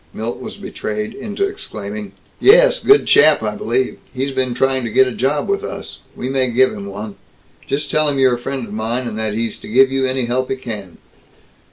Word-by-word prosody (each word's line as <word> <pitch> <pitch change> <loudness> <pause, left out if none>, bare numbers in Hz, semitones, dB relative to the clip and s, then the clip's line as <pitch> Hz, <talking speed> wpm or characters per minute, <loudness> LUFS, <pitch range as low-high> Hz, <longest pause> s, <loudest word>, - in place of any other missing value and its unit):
Milt 115 +2 -4
was - - -8
betrayed 105 0 -5
into 210 - -3
exclaiming. 105 - -7 0.3
"Yes. - - +6
Good 415 +1 +6
chap, 150 -5 +5
I 105 -1 -1
believe. 125 +5 -1
He's 135 +1 -2
been 130 -2 -1
trying 135 0 +1
to 115 - -2
get 130 +4 +4
a - - -2
job 130 +6 -1
with 400 +1 -1
us. - - -7 0.2
We 125 - -4
may 130 -1 +1
give 130 +2 +3
him 100 -1 -7
one. 100 +1 -7 0.5
Just 145 +2 -2
tell 155 -1 +3
him 140 - -1
you're 130 -2 +4
a 120 - -2
friend 135 0 -4
of 105 - -10
mine, 115 +4 -1
and 110 - -5
that 110 -1 -2
he's 115 -1 -2
to - - -10
give 130 +4 +4
you 135 0 +1
any 130 -1 0
help 130 +2 -1
he - - 0
can." 105 -8 -7
130 Hz, 215 wpm, -18 LUFS, 110-135 Hz, 0.5 s, Yes